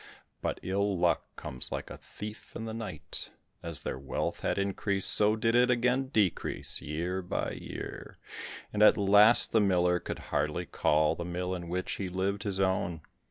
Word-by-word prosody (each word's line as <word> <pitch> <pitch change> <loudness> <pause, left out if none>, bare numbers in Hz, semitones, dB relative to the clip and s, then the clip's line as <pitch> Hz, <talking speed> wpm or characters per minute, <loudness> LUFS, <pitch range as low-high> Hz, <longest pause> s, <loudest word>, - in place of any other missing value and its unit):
But - - -2
ill 100 +1 0
luck - - +2
comes 65 -1 -3
like - - -5
a - - -7
thief 105 +1 -10
in 115 - -5
the 110 - -5
night, 115 -1 -5 0.3
as 85 -2 -3
their - - -4
wealth 70 - -3
had - - -1
increased 100 0 +2
so 105 +1 +6
did 115 +1 +1
it 125 +1 +4
again 125 +2 +2
decrease, 105 - +1
year 85 +5 -3
by 90 - -3
year, - - -8 0.6
and 105 - -1
at 105 - +7
last 105 +3 +6
the 110 - +4
miller 90 -3 +2
could - - -5 0.2
hardly - - 0
call 75 0 +2
the 85 - -5
mill 90 +1 -3
in 85 -2 -6
which 90 +1 -3
he 95 -2 -3
lived, 95 +2 -1
his 100 -3 -3
own. 95 -4 0
95 Hz, 175 wpm, -30 LUFS, 90-105 Hz, 0.6 s, at